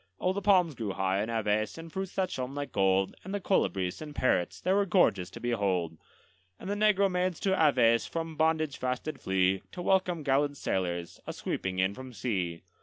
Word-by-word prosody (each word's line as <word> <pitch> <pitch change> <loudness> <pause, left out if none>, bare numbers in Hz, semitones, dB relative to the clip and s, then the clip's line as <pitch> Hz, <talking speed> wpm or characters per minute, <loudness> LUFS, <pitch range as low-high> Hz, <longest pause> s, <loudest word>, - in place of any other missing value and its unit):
Oh, 185 - +1
the 200 - -3
palms 185 -5 +4
grew 110 -6 -4
high 95 +1 0
in 110 - -3
Aves, 110 0 0
and 165 0 -9
fruits 190 -1 -4
that 190 -2 0
shone 130 +1 -4
like 145 0 -4
gold, 95 0 +2
And 190 +2 -4
the - - -1
colibris 95 - 0
and 150 -1 -8
parrots 90 -8 +1
they 185 - +1
were 200 +1 +3
gorgeous 170 - +3
to - - -10
behold; 95 -9 -1 0.6
And - - -8
the 200 - 0
negro 205 -1 +3
maids 180 -2 -1
to 195 - +2
Aves 125 -9 +4
from 165 -1 -4
bondage 155 -2 +1
fast 125 -1 -2
did 155 -3 -6
flee, 95 0 +1
To 180 - -6
welcome 180 -4 +1
gallant 145 +1 +1
sailors, 85 -5 -2
a - - -3
sweeping 95 -1 -3
in 95 +1 +2
from 130 +2 -9
sea. 95 -6 -2
130 Hz, 200 wpm, -29 LUFS, -, 0.6 s, palms